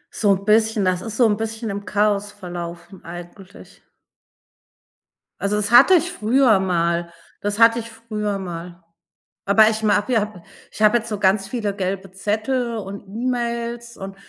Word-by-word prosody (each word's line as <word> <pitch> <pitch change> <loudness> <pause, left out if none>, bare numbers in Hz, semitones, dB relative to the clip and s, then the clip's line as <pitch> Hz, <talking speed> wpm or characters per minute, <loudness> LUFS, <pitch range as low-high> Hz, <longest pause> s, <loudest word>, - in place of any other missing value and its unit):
So 205 -2 +2
'n 195 +1 -9
bisschen, 220 -1 +3
das 185 -1 +1
ist 220 -1 -6
so 245 - +5
'n 210 -2 +2
bisschen 225 -1 -4
im 200 0 -6
Chaos 205 +1 0
verlaufen 175 -1 -8
eigentlich. 175 +3 -12 1.6
Also, 200 +1 0
das 210 +2 -1
hatte 270 +10 +8
ich 345 +2 +1
früher 225 -1 +3
mal, 170 -2 0 0.3
das 205 +2 -2
hatte 230 +1 +6
ich 230 0 -7
früher 215 -3 -4
mal. 175 -1 -7 0.7
Aber 215 +2 +6
ich 220 0 -3
mag 210 -1 +4
hab 210 -6 -1 0.3
ich - - -10
habe 215 +2 +5
jetzt 230 0 -6
so 210 -2 -3
ganz 195 0 +2
viele 210 -5 -3
gelbe 190 -1 -3
Zettel 225 +5 -2
und 200 -1 -7
E-Mails 235 +1 -3
und, 195 0 -8
210 Hz, 160 wpm, -21 LUFS, 190-225 Hz, 1.6 s, hatte